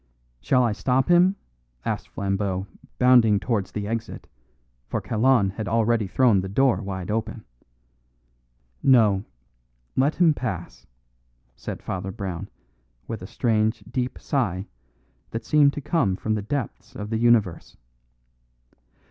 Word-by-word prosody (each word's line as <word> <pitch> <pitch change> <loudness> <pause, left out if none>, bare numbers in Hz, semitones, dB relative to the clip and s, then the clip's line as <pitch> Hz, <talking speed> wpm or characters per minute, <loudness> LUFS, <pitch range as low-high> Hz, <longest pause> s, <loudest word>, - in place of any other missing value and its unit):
"Shall 125 - +2
I 120 - +2
stop 130 +6 0
him?" 180 +2 +5 0.5
asked - - -3
Flambeau, 95 -1 -2 0.3
bounding 120 -5 +5
towards 105 -5 -2
the 105 -1 -4
exit, 115 0 -5 0.6
for - - -2
Kalon 115 -3 +2
had 100 +1 -5
already 115 +1 +1
thrown 115 -2 +3
the 95 - -5
door 130 +5 +3
wide 95 -1 -5
open. 110 +1 -3 1.4
"No; 110 -7 +4 0.7
let 140 +4 +2
him 170 -3 +4
pass," 95 - -6 0.7
said - - -7
Father 95 0 -4
Brown, 95 -3 -5 0.6
with 115 -4 -5
a 90 - -7
strange 110 0 0
deep 125 0 -2
sigh 95 - -1 0.6
that 115 - -5
seemed 145 -2 +4
to 145 - -5
come 130 - +1
from 110 +3 -2
the 105 - -1
depths 125 +3 -5
of 105 +1 -6
the 110 - 0
universe. 115 -7 +2
110 Hz, 130 wpm, -24 LUFS, 100-125 Hz, 1.4 s, him